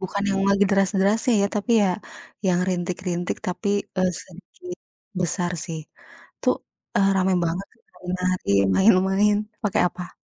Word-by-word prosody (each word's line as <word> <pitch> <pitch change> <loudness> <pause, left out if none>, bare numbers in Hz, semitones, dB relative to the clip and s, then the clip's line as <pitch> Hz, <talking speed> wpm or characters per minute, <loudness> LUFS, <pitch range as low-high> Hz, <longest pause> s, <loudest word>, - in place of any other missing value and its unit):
bukan 195 +1 -3
yang 195 0 0
lagi 200 0 +4
deras-derasnya 195 +4 +2
ya - - +3
tapi 210 +4 -2
ya 195 - +3 0.6
yang 180 -1 +3
rintik-rintik 180 0 -2
tapi, 185 +3 -3 0.3
eee, 185 -1 +2
sedikit 360 - -11 0.4
besar 175 0 -1
sih 165 -3 -5 0.6
itu, - - -3 0.5
eee, 195 -1 +4
rame 190 0 +2
banget 175 +4 -2
itu - - -33
nari-nari, 180 - -2 0.3
main-main 195 +1 +4 0.3
pakai 205 - +2
apa? 180 0 -9
190 Hz, 135 wpm, -23 LUFS, 180-200 Hz, 0.6 s, lagi